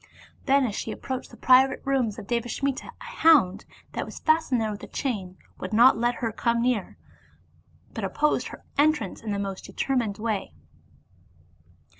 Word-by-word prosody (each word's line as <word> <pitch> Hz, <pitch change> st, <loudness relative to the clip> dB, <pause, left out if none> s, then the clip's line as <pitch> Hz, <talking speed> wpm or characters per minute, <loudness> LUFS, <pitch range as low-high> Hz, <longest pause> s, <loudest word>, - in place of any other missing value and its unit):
Then, 275 Hz, 0 st, +4 dB
as 220 Hz, -, -2 dB
she -, -, -4 dB
ap -, -, -6 dB
proached 260 Hz, -1 st, -4 dB
the -, -, -14 dB
private 260 Hz, +1 st, +5 dB
rooms 260 Hz, -6 st, 0 dB
of -, -, -8 dB
Devasmita,a 240 Hz, +4 st, -2 dB
hound, 315 Hz, -, +3 dB, 0.3 s
thatwas -, -, -5 dB
fastened 315 Hz, -5 st, +2 dB
there 220 Hz, -1 st, -1 dB
with 205 Hz, -, -7 dB
a -, -, -8 dB
chain, 195 Hz, -9 st, -4 dB, 0.2 s
would 185 Hz, -, -5 dB
not 240 Hz, +4 st, +7 dB
let 240 Hz, +2 st, 0 dB
her 225 Hz, -, -1 dB
come 235 Hz, +2 st, 0 dB
near, 240 Hz, -6 st, -1 dB, 1.0 s
but -, -, -5 dB
opposed 300 Hz, 0 st, 0 dB
her -, -, -11 dB, 0.2 s
entrance 295 Hz, -9 st, +2 dB
in 220 Hz, -, -4 dB
the 200 Hz, -, -1 dB
most 195 Hz, -1 st, -4 dB
determined 235 Hz, -7 st, -1 dB
way. 215 Hz, -3 st, -3 dB
240 Hz, 160 wpm, -26 LUFS, 210-270 Hz, 1.0 s, not